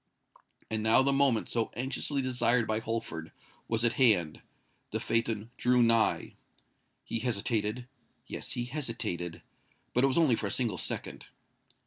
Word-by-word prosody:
And 110 -1 0
now 110 +4 +5
the 140 +1 +3
moment 135 -5 +2
so 115 -2 0
anxiously 135 +3 -2
desired 125 -2 +2
by 110 0 0
Holford, 110 -8 -4 0.4
was 115 +1 +1
at 120 - +3
hand:—the 95 -11 0
phaeton 115 -1 -1
drew 125 0 +3
nigh. 115 -1 +3 0.7
He 115 - -2
hesitated:—yes—he 120 +2 -4
hesitated;—but 115 - -4
it - - +6
was 135 - 0
only 155 -8 +4
for 105 - -3
a - - -3
single 110 -6 0
second. - - -4
115 Hz, 125 wpm, -30 LUFS, 110-125 Hz, 0.7 s, it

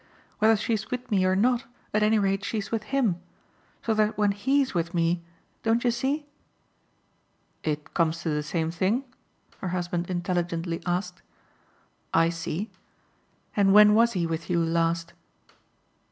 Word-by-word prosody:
Whether 220 +1 +5
she's 220 +1 -2
with 250 -1 -5
me 190 -3 +3
or 185 0 +3
not, 245 +5 +2 0.3
at 210 - +2
any 215 +1 +4
rate, 195 -1 +1
she's 210 -1 -3
with 225 -2 -2
HIM; 230 -11 0 0.6
so 225 - +1
that 215 0 +1
when 205 -1 +3
HE'S 265 +7 +1
with 170 0 -1
me, 170 +1 +1 0.4
don't 230 +1 +1
you 245 - +3
see 270 +5 -1 0.7
?" - - -42
"It 150 0 -6
comes 165 0 +1
to 165 - -1
the 150 0 0
same 160 +2 -2
thing?" 195 +9 0 0.6
her - - -4
husband 175 -1 -2
intelligently 175 -2 -2
asked. 180 0 -2 0.9
"I 165 0 +5
see. 170 +4 -4 0.8
And 200 -1 +4
when 210 0 +8
was 235 +2 +4
he 175 -3 0
with 165 0 -4
you 175 -1 +2
last?" 165 0 0
190 Hz, 155 wpm, -26 LUFS, 170-220 Hz, 0.9 s, when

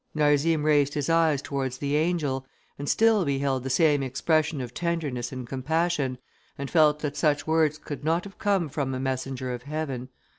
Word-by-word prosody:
Narzim 150 +1 +3
raised 145 -2 +3
his 145 +2 0
eyes 160 -4 +3
towards 135 -2 -3
the 140 +1 -1
angel, 150 -5 0 0.4
and 145 - -3
still 225 -3 +4
beheld 140 -3 0
the 135 - -4
same 145 +1 +3
expression 150 +4 0
of 125 -2 -5
tenderness 150 -8 -2
and 130 -2 -6
compassion, 145 0 -1 0.4
and 140 -1 -5
felt 150 -2 +4
that 145 -2 -3
such 150 -2 +1
words 155 -1 +2
could 145 -1 -7
not 165 +3 +1
have 200 -1 -12
come 195 -5 +1
from 135 -2 -2
a - - -3
messenger 130 -1 -3
of 120 - -5
heaven. 135 -3 -4
145 Hz, 180 wpm, -26 LUFS, 135-160 Hz, 0.4 s, still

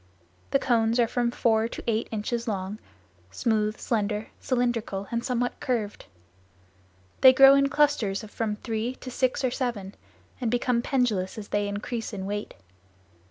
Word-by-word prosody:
The - - +3
cones 235 -3 +1
are 235 - +4
from 240 +1 0
four 225 -2 +2
to - - -8
eight 225 -1 0
inches 230 +2 -3
long, 200 0 -3 0.5
smooth, 215 - 0
slender, 210 -1 -1
cylindrical 235 -6 -1
and 235 0 -1
somewhat 245 -1 -1
curved. 220 -5 -2 1.2
They 260 - +10
grow 270 +1 +8
in 275 0 +4
clusters 280 -9 +1
of 210 - -11
from 220 -2 -2
three 225 +3 -3
to 255 - -9
six 255 +2 0
or 255 - +1
seven 230 -7 -3 0.5
and 240 - 0
become 245 0 +1
pendulous 230 -9 0
as 210 -2 -7
they 205 0 0
increase 220 +3 -4
in 190 -2 -4
weight. 205 +1 -4
230 Hz, 155 wpm, -26 LUFS, 210-245 Hz, 1.2 s, They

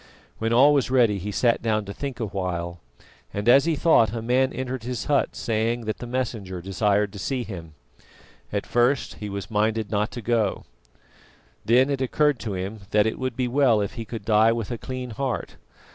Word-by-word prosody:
When 115 0 -1
all 135 +5 +6
was 135 -4 +1
ready 120 -6 +3
he 105 +3 -4
sat 115 +3 +2
down 110 -2 0
to 100 - -6
think 140 0 -5
a 115 - -1
while, 90 -3 -4 0.5
and 100 +2 -4
as 135 +4 +7
he 165 -1 +1
thought, 140 -8 +4
a 115 - -3
man 130 +3 +2
entered 130 -1 -4
his 125 0 -4
hut 145 -2 +1
saying 115 +1 -1
that 110 -1 -4
the 120 - -6
Messenger 115 -7 -3
desired 100 +2 0
to 100 - -8
see 130 +5 -2
him. 85 -8 -9 0.8
At - - -2
first 120 +3 +1
he 105 - -5
was 100 0 -6
minded 110 0 0
not 105 0 +1
to 120 - -5
go, 110 -3 0 1.0
then 130 +5 +4
it 135 -1 -1
occurred 145 +1 +2
to 105 -4 -4
him 95 +4 -4
that 105 0 +3
it 110 - -2
would 130 -2 -2
be 125 0 0
well 125 -3 +3
if 100 - -2
he 115 -3 -5
could 110 -2 -7
die 110 +1 +5
with 115 -2 -3
a 120 - -4
clean 130 -2 -5
heart. 125 +2 -3
115 Hz, 205 wpm, -24 LUFS, 105-125 Hz, 1.0 s, as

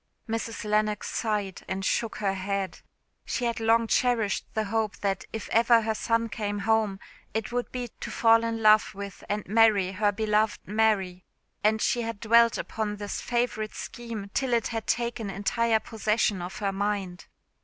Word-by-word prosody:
Mrs. 225 0 -3
Lennox 210 0 0
sighed 210 -4 -2
and 190 0 -3
shook 230 +2 0
her 195 -2 0
head. 195 0 -3 0.4
She 245 - -2
had 235 -1 -1
long 230 +1 +3
cherished 225 -3 +1
the 220 - +1
hope 215 0 -1
that 195 -2 -1
if 220 - -5
ever 230 0 +5
her 220 0 0
son 230 +1 0
came 205 -2 -3
home 210 -1 +1 0.4
it 220 +1 -2
would 245 0 -2
be 250 -1 -4
to - - -5
fall 230 0 +4
in 225 -1 -2
love 215 -1 +5
with 200 0 -8
and 210 0 -2
marry 210 -3 +4
her 205 +2 +1
beloved 215 +1 +1
Mary; 200 -4 +1 0.4
and 215 +1 +3
she 240 - +1
had 230 -2 -4
dwelt 230 +1 +5
upon 215 -2 -3
this 205 -1 -5
favourite 235 -3 -1
scheme 225 -4 -7
till 265 -2 0
it 230 -1 +1
had 225 -1 -4
taken 235 -3 -1
entire 220 +4 +1
possession 215 -3 0
of 180 +3 -6
her 200 -2 -1
mind. 195 -2 -3
215 Hz, 170 wpm, -27 LUFS, 200-230 Hz, 0.4 s, ever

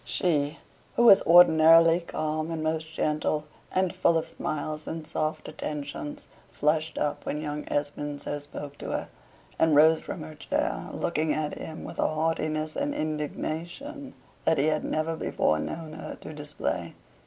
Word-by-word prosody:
She, 150 -3 0 0.4
who 240 - +3
was 210 -5 +9
ordinarily 165 0 +7
calm 155 -2 -3
and 165 -1 -3
most 160 0 -2
gentle, 150 -1 0 0.3
and 185 -1 +1
full 170 -3 +3
of 160 - -2
smiles 155 +1 -4
and 160 -1 -5
soft 155 0 -2
attentions, 145 0 -5 0.2
flushed 155 +1 0
up 150 - -1
when 150 - -3
young 150 -1 -4
Esmond 145 0 -2
so 145 - -3
spoke 145 0 -8
to - - -6
her, - - -3 0.5
and 160 -2 +4
rose 160 +2 +7
from 160 - -6
her 155 0 -8
chair, 150 - -2
looking 160 -2 0
at 155 -1 -2
him 160 - -7
with - - -8
a - - +3
haughtiness 155 0 -1
and 285 +1 -1
indignation 170 - -4 0.3
that 160 - +3
he 140 - +3
had 155 0 +1
never 160 +1 -1
before 80 - +1
known 155 - -5
her 155 - -7
to - - -8
display. 145 - -4
155 Hz, 160 wpm, -27 LUFS, 150-165 Hz, 0.5 s, was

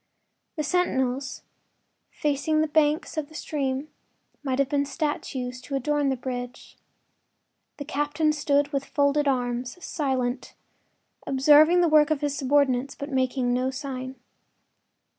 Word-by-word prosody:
The 305 - -2
sentinels, 270 -6 -1 0.7
facing 300 +1 0
the 315 - +1
banks 305 +1 +1
of 305 -2 -2
the 315 - -15
stream, 275 -1 -3 0.5
might 265 -3 -1
have 275 -1 +2
been 285 0 +1
statues 270 -4 -3
to 275 +2 -5
adorn 290 +1 +1
the 265 - +1
bridge. 245 -1 -6 1.0
The 285 - -6
captain 295 +2 0
stood 290 -1 +1
with 275 -1 0
folded 285 +1 +1
arms, 245 0 -1
silent, 260 -4 -2 0.7
observing 300 +6 +6
the 345 - +4
work 305 -1 +5
of 310 -2 0
his 290 -1 -1
subordinates, 275 -1 +1
but 280 +1 -7
making 255 -1 0
no 255 +1 +1
sign. 260 -1 -5
280 Hz, 130 wpm, -26 LUFS, 260-295 Hz, 1.0 s, observing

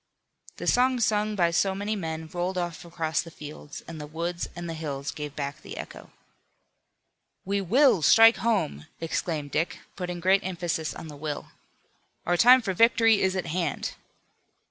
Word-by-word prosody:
The - - -6
song 250 0 +3
sung 215 -1 +1
by 170 -3 +2
so 190 +3 +1
many 205 +2 -2
men 160 -4 -4
rolled 180 +1 -2
off 175 -2 -3
across 165 -2 -1
the 165 - -10
fields, 150 -1 -10
and 160 -2 -7
the 150 - -7
woods 170 +3 -3
and 175 -1 -6
the 165 - -4
hills 145 -3 -4
gave 150 -2 -7
back 145 +1 -4
the - - -9
echo. - - -9 1.4
"We 200 +1 0
will 230 - +4
strike 225 +10 +7
home!" 190 - -1
exclaimed 160 -3 -3
Dick, 165 - -1 0.2
putting 180 -1 -4
great 190 +3 +3
emphasis 175 -3 -3
on - - -8
the 150 - -9
"will." 150 0 -5 0.8
"Our 175 - +2
time 245 +6 +7
for 195 -3 -1
victory 225 +1 +4
is 190 0 +1
at 190 - -2
hand." 165 -3 -2
175 Hz, 165 wpm, -27 LUFS, 160-200 Hz, 1.4 s, strike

